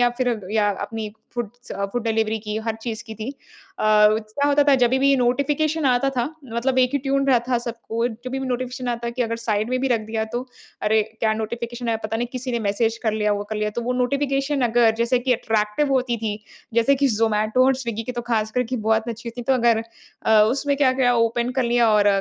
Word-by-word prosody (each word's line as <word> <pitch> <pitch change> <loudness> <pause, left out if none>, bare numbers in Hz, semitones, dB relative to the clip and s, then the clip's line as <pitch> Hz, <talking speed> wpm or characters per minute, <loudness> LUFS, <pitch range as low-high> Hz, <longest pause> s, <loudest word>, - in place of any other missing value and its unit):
या 245 - +5
फिर 245 -4 0
या 210 -2 +3
अपनी 215 +1 -5 0.2
फूडस 240 +1 -6
अ, 200 - -2
फूड 245 - -1
डिलिवरी 220 -1 0
की 210 0 -5
हर 225 - 0
चीज़ 230 -1 -4
की 220 -2 -8
थी। 220 +5 -5
अ, 280 - -11 0.5
क्या 215 +4 +3
होता 290 0 +4
था 280 - +7
जभी 255 0 +3
भी 275 +1 +4
नोटिफिकेशन 285 +5 +1
आता 255 +1 +2
था, 250 -3 -1 0.3
मतलब 255 +3 0
एक 255 -1 +4
ही 285 - +2
ट्यून 275 +1 0
रहा 255 - +5
था 245 - +2
सबको। 235 -1 -3
जब 240 +2 -8
भी 270 - -1
भी 265 - -4
नोटिफिकेशन 250 0 -3
आता 235 0 -2
कि 245 +1 -1
अगर 230 -1 -2
साइड 220 0 -1
में 255 - +1
भी 270 - 0
रख 235 -3 +2
दिया 220 0 -2
तो। 245 +2 -3 0.4
अरे! 215 +1 +3 0.2
क्या 220 -1 +2
नोटिफिकेशन 235 +2 -4
आया 225 - +1
पता 220 +1 -1
नहीं, 240 +2 -1
किसी 255 0 -4
ने 235 - 0
मैसेज 220 +2 0
कर 220 -3 +1
लिया, 210 -1 +1
वो 205 0 -2
कर 215 - -2
लिया। 210 0 -1
तो 235 - -4
वो 250 +2 -1
नोटिफिकेशन 275 +2 0
अगर 235 -1 +3
जैसे 235 +2 +2
कि 250 +1 +1
अट्रैक्टिव 225 +4 0
होती 250 -2 +1
थी 215 -2 -3 0.4
जैसे 235 +4 +4
कि 275 +1 +2
ज़ोमेटो 220 +1 +2
और 265 - +4
स्विगी 235 -4 -4
की 250 +2 -5
तो 240 - -4
खास 225 -2 -1
कर 250 +2 +1
की 255 - +1
बहुत 220 +1 +2
अच्छी 235 0 -5
थी। 245 +1 -7
तो 265 - +1
अगर 235 -2 +3 0.4
अ, 220 -1 +6
उसमें 280 +6 +1
क्या-क्या 260 -3 +3
ओपन 235 +1 +1
कर 260 - +3
लिया 235 -1 +3
और 210 -1 +4
235 Hz, 235 wpm, -22 LUFS, 220-255 Hz, 0.5 s, था